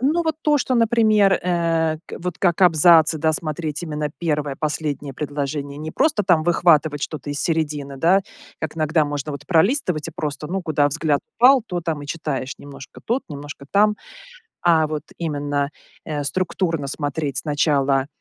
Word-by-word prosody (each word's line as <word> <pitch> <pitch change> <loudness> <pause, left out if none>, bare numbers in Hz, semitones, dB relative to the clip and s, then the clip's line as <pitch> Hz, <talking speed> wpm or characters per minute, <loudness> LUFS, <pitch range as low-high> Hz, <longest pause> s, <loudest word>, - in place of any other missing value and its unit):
Э, 255 - -2
ну, 345 0 +1
вот 320 -1 -1
то, 295 -1 +3
что, 255 0 0
например, 215 -4 +4
э, 165 -3 0
к - - -8
вот 180 0 -5
как 175 0 +2
абзацы, 160 -1 +6
да, 160 +1 +2
смотреть 155 0 -3
именно 150 -2 -3
1, 150 -4 -1
последнее 150 -2 -3
предложение, 145 0 -4
не 155 +1 -5
просто 270 - +1
там 175 -4 +3
выхватывать 155 -4 +3
что-то 145 -2 -5
из 145 - -3
середины, 150 -4 -2
да, 180 +7 +4 0.4
как 160 0 -4
иногда 155 0 +2
можно 145 0 -4
вот 140 - -8
пролистывать 180 - +2
и - - -5
просто, 150 0 -4
ну, 190 +2 -3
куда 150 -3 +2
взгляд 150 0 0 0.2
упал, 255 +1 +6
то 175 -1 -3
там 160 -3 -3
и 145 - -8
читаешь: 145 -4 -3
немножко 140 -1 -12
тут, 245 +4 0
немножко 145 -1 -9
там. 210 +1 +3 0.7
А 160 -3 +4
вот 155 -1 -4
именно, 145 -3 -2 0.4
э, 150 -2 -3
структурно 165 -2 -1
смотреть 145 0 -3
сначала, 140 -3 +1
155 Hz, 170 wpm, -21 LUFS, 145-175 Hz, 0.7 s, абзацы